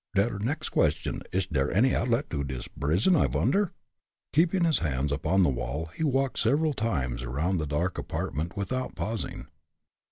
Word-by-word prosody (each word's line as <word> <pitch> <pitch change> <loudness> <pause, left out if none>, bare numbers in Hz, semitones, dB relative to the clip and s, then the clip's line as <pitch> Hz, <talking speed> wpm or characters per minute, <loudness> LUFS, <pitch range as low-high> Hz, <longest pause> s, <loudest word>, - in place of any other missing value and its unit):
Der 100 +1 +2
next 145 +9 -2
question, - - +1
ish 95 -2 0
der 70 -1 +1
any 125 +7 +4
outlet 125 +4 +1
to 70 -3 -1
dis 65 -3 -5
brison, 90 - +2
I 150 - +4
vonder?" 200 -2 +1 0.6
Keeping 170 +4 +3
his 165 -3 +3
hands 70 -2 -1
upon 95 +7 +2
the 85 - +4
wall, 70 +6 -3
he - - -2
walked 135 -2 +1
several 145 +6 +2
times 65 - -1
around 75 +9 -1
the 75 - -2
dark 85 +5 -1
apartment 80 +7 -3
without 130 +6 -2
pausing. 110 0 -3
95 Hz, 165 wpm, -28 LUFS, -, 0.6 s, any